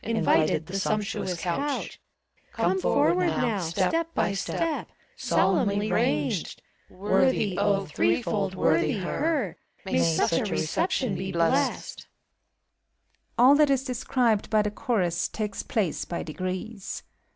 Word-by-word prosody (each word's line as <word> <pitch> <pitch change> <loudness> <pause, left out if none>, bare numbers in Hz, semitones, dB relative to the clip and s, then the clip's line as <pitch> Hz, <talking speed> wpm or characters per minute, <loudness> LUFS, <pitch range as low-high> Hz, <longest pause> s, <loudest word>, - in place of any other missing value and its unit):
Invited, 160 -8 +2
the 190 +4 -3
sumptuous 205 -3 -2
couch. 275 - -3 0.5
Come 190 -4 +1
forward, 170 +1 +2
now. 225 -5 0
Step 200 - -1
by - - +1
step. 315 +11 -2 0.3
Solemnly 205 -1 +1
ranged! 150 +4 0 0.3
Worthy, 205 +1 +1
0, 195 +1 +1
threefold 165 - 0
worthy 160 -3 +2
her, 270 - -1 0.3
May 85 - 0
such 85 - +2
a - - -1
reception 260 - 0
be 190 +1 -4
blessed! 170 -1 0
• - - -11 1.3
(All 255 +3 +7
that 295 0 +4
is 270 -1 +2
described 245 -4 0
by 215 -1 +3
the 210 - -2
Chorus 180 -7 0
takes 210 -2 -4
place 195 -8 -1
by 170 - -4
degrees. 185 +5 -5
200 Hz, 120 wpm, -26 LUFS, 175-230 Hz, 1.3 s, All